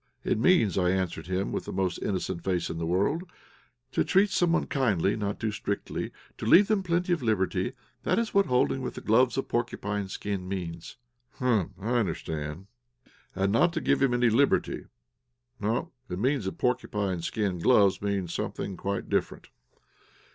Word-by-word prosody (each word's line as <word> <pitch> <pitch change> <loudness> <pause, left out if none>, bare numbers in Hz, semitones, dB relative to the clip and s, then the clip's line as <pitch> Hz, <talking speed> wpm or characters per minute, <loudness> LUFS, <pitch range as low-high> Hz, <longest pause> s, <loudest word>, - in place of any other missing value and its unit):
"It - - 0
means," 115 - +4
I 90 -1 +2
answered 90 -3 -1
him, 95 +1 -1
with - - -3
the - - -5
most 95 -2 -1
innocent 95 -3 -2
face 90 -2 -1
in 80 - -5
the 85 - -2
world, 100 - +1 0.7
"to - - +2
treat 195 +1 +3
someone 175 -1 +2
kindly, 110 - +1
not 100 -2 -3
too 110 - -1
strictly, 100 -1 -3 0.3
to - - -4
leave 195 - +6
him 210 -2 +3
plenty 175 0 +1
of 170 - -1
liberty; 100 -1 0 0.3
that - - +1
is 230 -1 -1
what 200 -1 +4
holding 125 +1 +2
with 125 - -6
gloves 125 +4 +4
of 135 - -1
porcupine 105 -4 -2
skin 95 -1 -4
means." 85 -2 -5 0.4
"Humph! 110 -7 0
I 115 +5 0
understand." 80 -3 -3 0.7
"'And 95 +1 +1
not 165 - +2
give - - +2
him 130 -3 +3
any 120 -1 +3
liberty' 140 +6 +2 0.7
No; 115 - -1 0.2
it 90 - -4
seems 130 -1 +1
that 95 - -4
porcupine 105 -7 -1
skin 95 +1 -1
gloves 100 0 +4
means 100 -4 -1
something 95 - -4
quite 100 0 -3
different.' - - -2
105 Hz, 165 wpm, -28 LUFS, 95-130 Hz, 0.7 s, leave